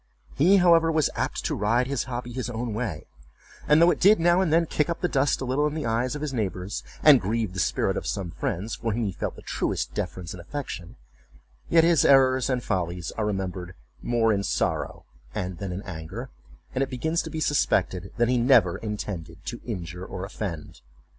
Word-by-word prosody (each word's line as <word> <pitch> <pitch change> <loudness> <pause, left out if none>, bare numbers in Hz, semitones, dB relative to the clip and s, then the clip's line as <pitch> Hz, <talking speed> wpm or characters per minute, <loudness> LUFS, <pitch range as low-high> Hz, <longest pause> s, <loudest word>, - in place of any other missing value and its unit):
He, 180 +8 +5
however, 170 -3 +5
was 155 -3 +2
apt - - -2
to - - 0
ride 115 +5 +1
his 135 0 -2
hobby 120 -1 -5
his 125 -1 -3
own 120 -1 -3
way; 105 -9 -3 0.6
and 150 +1 +6
though 170 +1 +6
it - - -2
did 205 +1 +6
now 175 +2 +4
and 180 -5 +1
then 165 +1 +4
kick 150 0 0
up 170 - -3
the 180 - +2
dust 140 -3 +1
a - - -2
little 135 +4 +1
in 150 - -4
the 155 - -3
eyes 120 +4 0
of 150 - -5
his 145 -3 -3
neighbors, 100 -4 -3 0.2
and 145 -5 +8
grieve 110 -1 -1
the 90 - -4
spirit - - +1
of - - -4
some 90 -4 -3
friends, 90 +4 -3
for 115 -2 -2
whom 115 +2 -1
he 100 - -1
felt - - -4
the - - -13
truest - - -2
deference 90 -2 -4
and 90 - -9
affection; 100 -5 -6 0.7
yet 165 -1 +5
his 165 -3 +4
errors 130 -1 +5
and 125 -2 0
follies 90 -3 -2
are 110 -1 -2
remembered 95 -3 -4 0.3
"more 115 -2 +2
in 100 - 0
sorrow - - -2 0.3
than 90 0 -3 0.2
in 95 +3 -5
anger," 95 +8 -7 0.4
and 130 - -1
it 135 - 0
begins 160 +6 -1
to - - -7
be 160 - -4
suspected, 95 - +1
that 120 0 +3
he 125 0 +2
never 120 -8 +4
intended 95 -5 -6
to 120 - -5
injure 90 -5 -5
or 95 0 -6
offend. 90 - -6
120 Hz, 205 wpm, -26 LUFS, 95-145 Hz, 0.7 s, and